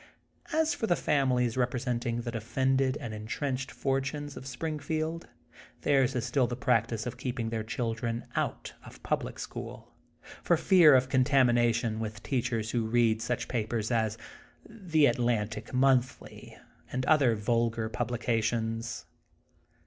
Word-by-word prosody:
As 320 Hz, 0 st, +2 dB
for 225 Hz, -, -2 dB
the 175 Hz, -, +3 dB
families 125 Hz, -7 st, +1 dB
representing 120 Hz, -1 st, -1 dB
the 120 Hz, 0 st, -4 dB
de 115 Hz, -1 st, -4 dB
fended 130 Hz, +3 st, +1 dB
and 115 Hz, -, -6 dB
entrenched 130 Hz, +5 st, -3 dB
fortunes 140 Hz, +2 st, -2 dB
of 130 Hz, -, -8 dB
Spring 155 Hz, +4 st, -4 dB
field, 160 Hz, +3 st, -3 dB, 0.5 s
theirs 135 Hz, -4 st, +2 dB
is 120 Hz, -, -1 dB
still 130 Hz, -4 st, +1 dB
the 120 Hz, -, -3 dB
practice 115 Hz, -2 st, 0 dB
of 125 Hz, -, -6 dB
keeping 120 Hz, -3 st, -3 dB
their 110 Hz, -1 st, -2 dB
children 115 Hz, +1 st, -3 dB
out -, -, -2 dB
of -, -, -14 dB
public -, -, -2 dB
school, -, -, -8 dB, 0.5 s
for -, -, +3 dB
fear 170 Hz, -7 st, +6 dB
of 130 Hz, 0 st, +3 dB
contamination 120 Hz, -4 st, +2 dB
with 110 Hz, -1 st, -5 dB
teachers 120 Hz, -4 st, -1 dB
who 115 Hz, -2 st, 0 dB
read 115 Hz, -1 st, +2 dB
such 125 Hz, +1 st, -2 dB
papers 110 Hz, -1 st, -2 dB
as 110 Hz, -2 st, 0 dB, 0.5 s
The 180 Hz, -9 st, +1 dB
Atlantic 115 Hz, -3 st, 0 dB
Monthly, 130 Hz, -1 st, 0 dB, 0.3 s
and 130 Hz, +1 st, -2 dB
other 135 Hz, -7 st, +4 dB
vulgar 115 Hz, +1 st, 0 dB
publications. 115 Hz, -1 st, -2 dB
120 Hz, 135 wpm, -29 LUFS, 115-135 Hz, 0.5 s, fear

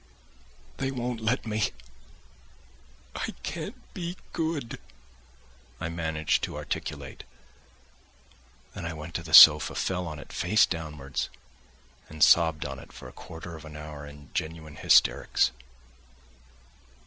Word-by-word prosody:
"They 135 Hz, 0 st, -1 dB
won't 125 Hz, -3 st, -3 dB
let 115 Hz, +4 st, 0 dB
me... 110 Hz, -1 st, 0 dB, 1.5 s
I -, -, -4 dB
can't -, -, -7 dB
be 175 Hz, 0 st, -5 dB, 0.2 s
good!" 160 Hz, -7 st, -3 dB, 1.0 s
I 85 Hz, -, -3 dB
managed 80 Hz, -2 st, 0 dB
to -, -, -8 dB
articulate; -, -, -5 dB, 1.5 s
then -, -, -7 dB
I 85 Hz, 0 st, -3 dB
went 80 Hz, +2 st, -8 dB
to -, -, -2 dB
the 80 Hz, -1 st, -10 dB
sofa, 75 Hz, -1 st, +10 dB
fell 90 Hz, -2 st, -1 dB
on 75 Hz, -2 st, -6 dB
it 75 Hz, -, -11 dB
face 105 Hz, +5 st, +4 dB
downwards, 75 Hz, -5 st, -4 dB, 0.8 s
and 80 Hz, 0 st, 0 dB
sobbed 80 Hz, -3 st, +5 dB
on 70 Hz, -1 st, -5 dB
it -, -, -14 dB
for -, -, -11 dB
a -, -, -12 dB
quarter 80 Hz, +1 st, -9 dB
of 80 Hz, -, -11 dB
an 75 Hz, -1 st, -10 dB
hour 75 Hz, -1 st, -8 dB
in 70 Hz, -1 st, -14 dB
genuine 80 Hz, -1 st, -5 dB
hysterics. 70 Hz, -, +4 dB
80 Hz, 125 wpm, -27 LUFS, 75-105 Hz, 1.5 s, sofa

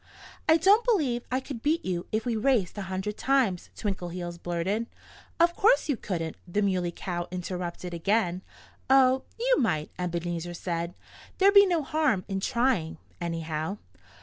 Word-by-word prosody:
"I 320 Hz, -, +7 dB
don't 400 Hz, +7 st, +5 dB
believe 295 Hz, -, +1 dB
I 255 Hz, -, +2 dB
could 265 Hz, -3 st, -7 dB
beat 315 Hz, +5 st, +1 dB
you 175 Hz, -2 st, -2 dB
if 220 Hz, +2 st, -1 dB
we 240 Hz, -2 st, 0 dB
raced 220 Hz, -5 st, +1 dB
a 205 Hz, -, -4 dB
hundred 190 Hz, +3 st, -3 dB
times," 255 Hz, -10 st, +1 dB
Twinkleheels 175 Hz, -3 st, -4 dB
blurted. 185 Hz, +7 st, -1 dB, 0.5 s
"Of 340 Hz, +1 st, +4 dB
course 450 Hz, -4 st, +4 dB
you 285 Hz, -, +2 dB
couldn't!" 165 Hz, -7 st, -4 dB
the 205 Hz, +4 st, 0 dB
Muley 185 Hz, -3 st, 0 dB
Cow 175 Hz, 0 st, -4 dB
interrupted 180 Hz, -1 st, -5 dB
again. 185 Hz, +1 st, +1 dB, 0.5 s
"Oh, 265 Hz, -1 st, +5 dB
you -, -, +3 dB
might," 155 Hz, -, 0 dB
Ebenezer 175 Hz, -1 st, -3 dB
said. 170 Hz, 0 st, -3 dB, 0.4 s
"There'd 395 Hz, +1 st, +5 dB
be 400 Hz, 0 st, +8 dB
no 340 Hz, -4 st, +1 dB
harm 295 Hz, -10 st, +1 dB
in 195 Hz, -1 st, -2 dB
trying, 230 Hz, -8 st, 0 dB, 0.2 s
anyhow. 165 Hz, +1 st, -3 dB
195 Hz, 150 wpm, -27 LUFS, 175-265 Hz, 0.5 s, be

